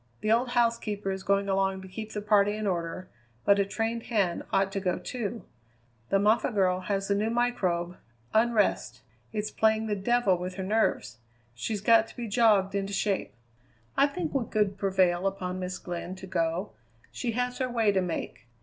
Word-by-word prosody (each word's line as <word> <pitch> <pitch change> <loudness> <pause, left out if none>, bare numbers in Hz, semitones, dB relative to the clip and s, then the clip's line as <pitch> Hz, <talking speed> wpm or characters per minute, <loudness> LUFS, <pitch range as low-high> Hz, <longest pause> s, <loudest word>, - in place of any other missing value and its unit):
The 215 - +1
old 240 +2 +3
housekeeper 215 -4 +1
is 190 0 -4
going 200 +1 +1
along 195 0 0
to - - -9
keep 215 +4 -7
the 210 -1 -4
party 205 -1 +3
in 215 0 -3
order, 180 -1 -2 0.4
but 200 0 +5
a 200 - +3
trained 225 +3 -2
hand 200 -7 +1
ought 195 0 +2
to 195 - -2
go, 185 -2 0
too. 230 -2 -5 0.6
The 195 - +3
Moffatt 215 +3 +2
girl 185 -2 +2
has 195 +1 -2
the 200 - +2
new 210 +2 0
microbe 190 -8 0 0.4
Unrest. 225 -1 +2 0.3
It's 215 0 -3
playing 220 0 +2
the 210 -1 -1
devil 205 0 +2
with 180 +1 -5
her 190 - -4
nerves. 190 - 0 0.3
She's 195 - -3
got 225 +1 +5
to - - -15
be 240 -1 -4
jogged 210 -3 +3
into 200 0 -2
shape." 200 - -1 0.6
"I 280 - +5
think 320 +2 -4
we 265 -5 0
could 200 -2 0
prevail 190 -2 +2
upon 185 -1 -3
Miss 180 0 -4
Glynn 175 +1 -6
to 190 - -9
go. 175 +1 -1 0.4
She 235 -2 -3
has 250 +1 -2
her 255 -1 0
way 225 -4 +2
to 190 -1 +1
make. 170 -8 -5
200 Hz, 185 wpm, -28 LUFS, 190-225 Hz, 0.6 s, but